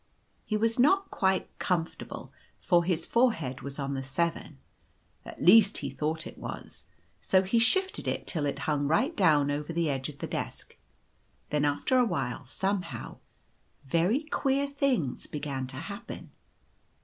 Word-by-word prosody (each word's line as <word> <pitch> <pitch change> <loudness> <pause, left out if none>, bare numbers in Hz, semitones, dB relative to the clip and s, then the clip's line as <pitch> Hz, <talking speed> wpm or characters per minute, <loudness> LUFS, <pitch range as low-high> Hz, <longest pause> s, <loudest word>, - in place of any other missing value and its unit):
He 215 - 0
was 230 +3 +1
not 385 +10 +4
quite 190 -1 +1
comfortable, 170 -3 -3 0.3
for 175 -2 +3
his 170 -2 0
forehead 165 - +1
was 140 0 -6
on 140 -1 -2
the 135 - -2
7, 155 +2 -2 0.7
at - - -10
least 205 +4 +7
he 140 -2 -4
thought 155 +3 -2
it - - -10
was; - - -7 0.4
so 190 0 +3
he 210 +5 +2
shifted 380 +12 +2
it - - -2
till 150 -4 -1
it 140 - -2
hung 145 -2 +1
right 255 - +2
down 150 -7 +4
over 150 +2 -3
the 165 -2 0
edge 135 +1 -3
of 145 - -10
the - - -4
desk. - - -5 0.8
Then, 150 -1 +2
after 145 - +2
a 250 - +5
while, 135 - -3
somehow, 190 +6 -3 0.7
very 175 - +2
queer 280 -2 0
things 275 - -1
began 140 -3 -4
to 130 0 -8
happen. 200 +8 -7
165 Hz, 155 wpm, -29 LUFS, 145-225 Hz, 0.8 s, least